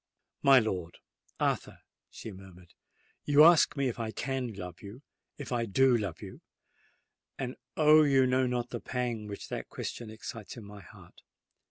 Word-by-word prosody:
"My 135 -1 +7
lord—Arthur," 90 -8 -3 0.3
she 110 - -9
murmured, 95 -2 -14 0.5
"you 145 +1 +6
ask 165 -2 +6
me 140 -1 +1
if 120 -1 -4
I 115 -1 -3
can 130 +1 -3
love—if 100 - -11
I 120 -2 0
do 130 +5 +4
love 100 -7 -3
you:—and, 125 -1 -12 0.2
oh! 155 0 +7
you 135 -3 +4
know 130 0 +2
not 125 -1 -2
the - - -5
pang 120 -4 -3
which 100 -1 -8
that - - -5
question 120 -2 -6
excites 110 +1 -8
in 115 - -9
my 100 0 -11
heart! - - -17
120 Hz, 145 wpm, -30 LUFS, 105-135 Hz, 0.5 s, My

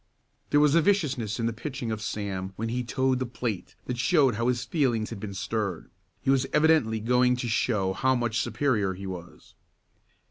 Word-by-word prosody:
There 145 - +4
was 150 -1 +4
a 170 - +5
viciousness 140 - 0
in 115 - 0
the 115 - 0
pitching 125 0 -5
of 110 -1 -3
Sam 95 -3 -4
when 115 +3 -3
he 125 +2 -1
toed 130 +1 0
the 130 - -1
plate 115 -5 -4
that 125 -1 -4
showed 135 -2 +4
how 115 +3 -1
his 125 -1 0
feelings 120 -9 0
had 115 - -6
been 100 -1 -6
stirred. 100 -1 -3 0.3
He 135 - +3
was 135 0 +2
evidently 150 -8 +3
going 125 +2 +3
to 125 -1 -3
show 105 -4 +1
how 130 +7 +2
much 120 -2 0
superior 105 -10 0
he 95 +2 -8
was. 85 -4 -9
120 Hz, 190 wpm, -27 LUFS, 105-130 Hz, 0.3 s, a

